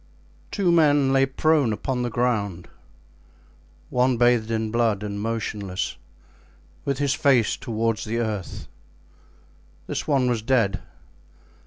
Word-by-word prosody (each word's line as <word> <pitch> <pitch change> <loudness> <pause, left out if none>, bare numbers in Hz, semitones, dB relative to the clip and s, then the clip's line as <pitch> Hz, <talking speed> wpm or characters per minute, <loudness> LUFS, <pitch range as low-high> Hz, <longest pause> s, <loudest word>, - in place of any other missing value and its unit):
Two 190 -4 +1
men 145 -5 +4
lay 135 0 +4
prone 145 -2 +2
upon 125 +4 -2
the 120 - -1
ground, 110 -7 -1 1.2
one 125 0 +2
bathed 120 -2 +3
in 110 -1 -1
blood 115 -3 +1
and 100 -1 -4
motionless, 105 -4 -3 0.9
with 140 -2 -1
his 140 -1 +1
face 130 -8 +3
toward 115 -1 -1
the 115 +2 -3
earth; 110 -5 -4 1.2
this - - -4
one 135 -4 +2
was 120 -3 0
dead. 110 -6 +1
120 Hz, 120 wpm, -24 LUFS, 110-135 Hz, 1.2 s, men